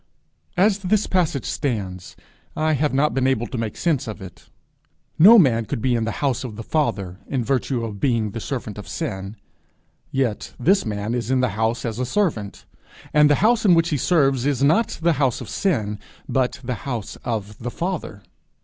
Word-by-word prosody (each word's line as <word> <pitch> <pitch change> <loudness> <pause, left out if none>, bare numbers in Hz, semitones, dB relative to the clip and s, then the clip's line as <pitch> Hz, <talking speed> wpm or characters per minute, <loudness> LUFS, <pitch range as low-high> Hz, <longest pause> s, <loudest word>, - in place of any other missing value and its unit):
As 200 +2 +3
this 200 +2 +1
passage 165 - 0
stands, 100 - -3 0.4
I 155 0 +1
have 150 +1 +1
not 140 +1 +2
been 130 0 +1
able 130 -3 +1
to 125 - -6
make 110 -2 -4
sense 155 -8 0
of 110 -1 -6
it. 95 -4 -12 0.7
No 210 +9 +9
man 120 - +4
could 115 +4 -3
be 125 +2 +1
in 115 -2 0
the 115 - -4
house 135 -3 0
of 120 -5 -6
the 115 - -7
Father 100 - -1
in 130 -3 -1
virtue 125 -1 -1
of 105 -3 -7
being 115 -5 +1
the 115 - -5
servant 115 -4 -5
of 105 - -9
sin; 95 +2 -4 0.7
yet 130 -6 -2
this 185 - +3
man 105 +1 -2
is 120 -1 -2
in 130 -1 +2
the 125 - +2
house 110 +4 -1
as 115 0 -3
a 125 - 0
servant, 130 - -1 0.5
and 150 0 +6
the 145 - +5
house 230 0 +3
in 185 -5 +6
which 165 0 +2
he 150 - 0
serves 135 -4 +2
is 140 -2 0
not 165 +11 +2
the 170 0 +4
house 130 -4 +2
of 120 - -8
sin, 105 - -1 0.3
but 130 +1 0
the 125 -2 -4
house 115 -5 -4
of 105 -3 -4
the 120 - -4
Father. 165 - -4
125 Hz, 195 wpm, -22 LUFS, 110-150 Hz, 0.7 s, No